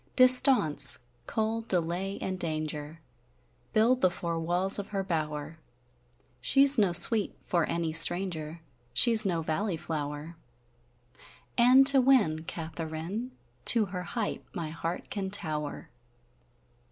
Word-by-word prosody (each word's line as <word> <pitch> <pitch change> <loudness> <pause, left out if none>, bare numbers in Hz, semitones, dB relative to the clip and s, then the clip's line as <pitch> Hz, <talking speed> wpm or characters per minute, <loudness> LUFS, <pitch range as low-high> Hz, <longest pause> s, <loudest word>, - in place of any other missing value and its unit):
Distaunce, 250 - +6 0.3
cold, 225 +1 -4
delay, 180 +3 -3
and 185 -1 -6
danger, 155 -1 -5 0.7
Build 240 +4 0
the 185 - +2
four 170 -1 -6
walles 180 +5 +2
of 200 - -7
her 195 -2 -5
bower; 155 -3 -6 0.8
She 275 +1 +3
's 275 -3 +7
noe 200 -3 +2
Sweete 210 +4 +4
for 170 -3 -2
any 165 -2 -4
stranger, 165 -1 +1 0.3
She 230 - +5
's 220 -2 +5
noe 170 -3 -3
valley 170 +3 -4
flower: 150 +1 -7 1.2
And 250 +3 +4
to 275 -1 +3
winne 210 -13 0
Katheryn, 165 +7 -7 0.4
To 230 -3 +4
her 180 - -5
height 210 +4 -6
my 165 -4 -6
heart 165 +2 -7
can 195 -2 -5
Tower! 155 -6 -2
175 Hz, 125 wpm, -26 LUFS, 160-215 Hz, 1.2 s, s